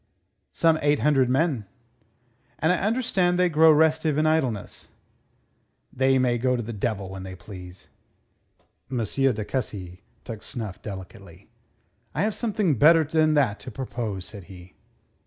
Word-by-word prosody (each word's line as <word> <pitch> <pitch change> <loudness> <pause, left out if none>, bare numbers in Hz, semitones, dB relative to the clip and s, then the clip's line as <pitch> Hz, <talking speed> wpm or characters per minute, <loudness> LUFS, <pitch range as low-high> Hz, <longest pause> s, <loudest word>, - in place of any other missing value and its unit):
"Some 165 -1 +2
eight 145 0 +2
hundred 135 -4 +3
men." 130 -4 +1 0.9
"And 160 +3 +2
I - - +1
understand 200 -5 +1
they 180 0 +3
grow 160 0 +6
restive 155 -1 +3
in 155 - +2
idleness." 135 -10 -1 1.1
"They 130 +1 +3
may 125 -2 +1
go 125 +1 +1
to 120 - -2
the 115 +2 -6
devil 100 -2 -2
when 95 0 -7
they 95 0 -8
please." 90 0 -11 1.0
M. 130 - -3
de 125 -4 0
Cussy 95 -8 -5 0.2
took 110 -3 -7
snuff 110 -5 -6
delicately. 95 -3 -10 0.7
"I 155 - +1
have 215 +1 0
something 205 - 0
better 165 +3 +6
than 155 0 +2
that 125 -8 +2
to - - -9
propose," 115 -6 -5
said 100 -4 -10
he. 90 -1 -13
130 Hz, 145 wpm, -25 LUFS, 105-160 Hz, 1.1 s, grow